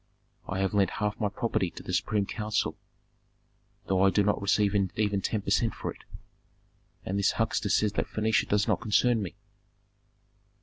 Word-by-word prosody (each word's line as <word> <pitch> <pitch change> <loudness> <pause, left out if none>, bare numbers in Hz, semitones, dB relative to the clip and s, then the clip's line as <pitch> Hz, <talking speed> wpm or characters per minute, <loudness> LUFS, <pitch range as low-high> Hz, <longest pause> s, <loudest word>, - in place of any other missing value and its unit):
I 95 - -3
have 95 +1 0
lent 100 -1 +3
half 105 -1 -2
my 105 -3 +1
property 105 -4 -1
to - - -11
the - - -5
supreme 105 -2 +1
council, 105 +1 -2 1.1
though 95 -1 +1
I 95 - +6
do 100 +2 +2
not 105 0 +1
receive 100 0 +2 0.2
even 105 -2 0
ten 105 +2 -1
per 100 - -3
cent 115 +3 +2
for - - -4
it. - - -20 1.0
And 100 +2 -1
this 100 - +2
huckster - - 0
says 105 -1 +2
that - - -1
Phœnicia 110 0 +1
does 105 0 +2
not - - +1
concern 115 +1 +2
me!" 90 -3 -5
105 Hz, 175 wpm, -28 LUFS, 100-110 Hz, 1.1 s, I